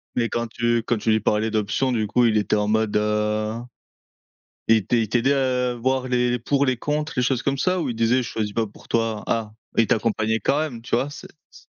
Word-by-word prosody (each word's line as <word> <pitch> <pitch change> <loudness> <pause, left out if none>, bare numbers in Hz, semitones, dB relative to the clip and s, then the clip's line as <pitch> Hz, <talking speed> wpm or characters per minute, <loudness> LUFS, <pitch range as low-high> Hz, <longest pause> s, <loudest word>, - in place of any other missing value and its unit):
Mais 115 -2 +1
quand 120 0 -2
tu 120 0 0
quand 120 - 0
tu 110 - -2
lui 110 - +3
parlais 110 +1 +1
d'options 110 +5 0
du 110 -3 0
coup, 120 +4 +3
il 110 -2 +3
était 105 - +1
en 105 0 0
mode, 110 0 +1
heu, 105 0 0 1.1
il 110 -4 +4
il 115 -3 +3
t'aidait 125 +5 +2
à 125 -2 0
voir 130 +2 -1
les 125 0 +1
pour 140 +4 +1
les 130 -1 +1
contre 150 +5 -2
quelque 125 - +1
chose 125 -1 0
comme 140 0 -1
ça? 185 +4 +1
Ou 155 - -2
il 115 - -5
disait: 115 +2 +3
«Je 120 - -5
choisis 105 -2 -3
pas 115 +1 0
pour 105 - -16
toi?» 115 -2 -1
Ah, 110 -2 -1 0.2
il 115 - +4
t'accompagnait 110 0 +1
quand 140 - +1
même, 145 -7 -4
tu 120 - -2
vois? 135 +4 0
C'est 145 - -10 0.2
s - - -16
115 Hz, 230 wpm, -23 LUFS, 110-125 Hz, 1.1 s, il